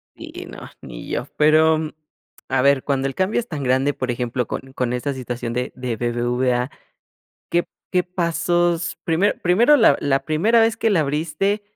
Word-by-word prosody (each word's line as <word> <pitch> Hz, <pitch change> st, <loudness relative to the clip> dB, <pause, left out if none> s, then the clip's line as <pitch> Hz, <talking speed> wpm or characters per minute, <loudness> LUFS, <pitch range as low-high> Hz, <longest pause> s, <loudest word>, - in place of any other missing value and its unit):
Sí, -, -, -10 dB
no, -, -, -10 dB
ni -, -, -9 dB
yo, -, -, -2 dB
pero, 155 Hz, +1 st, +4 dB, 0.7 s
a 130 Hz, 0 st, +2 dB
ver, 140 Hz, 0 st, +3 dB
cuando 135 Hz, -1 st, 0 dB
el 135 Hz, -, -6 dB
cambio 190 Hz, +5 st, +1 dB
es 240 Hz, -, -5 dB
tan 150 Hz, -8 st, -5 dB
grande, 130 Hz, +3 st, +2 dB
por 130 Hz, -2 st, -3 dB
ejemplo, 120 Hz, 0 st, -2 dB
con 135 Hz, +3 st, -7 dB
con 125 Hz, -2 st, -1 dB
esta 125 Hz, +3 st, -2 dB
situación 120 Hz, -2 st, -5 dB
de 125 Hz, +1 st, -2 dB
de 125 Hz, -2 st, -3 dB
BBVA, 120 Hz, +2 st, 0 dB, 0.8 s
¿qué 175 Hz, 0 st, 0 dB, 0.2 s
qué 180 Hz, -1 st, +3 dB
pasos?, 175 Hz, -1 st, 0 dB
primero 170 Hz, +5 st, +1 dB
primero 230 Hz, +12 st, +5 dB
la 225 Hz, -5 st, +5 dB
la 135 Hz, -1 st, 0 dB
primera 205 Hz, +10 st, +3 dB
vez 225 Hz, 0 st, +2 dB
que 225 Hz, -, +1 dB
la 185 Hz, -5 st, +3 dB
abriste, 155 Hz, +8 st, -1 dB
150 Hz, 175 wpm, -21 LUFS, 125-175 Hz, 0.8 s, primero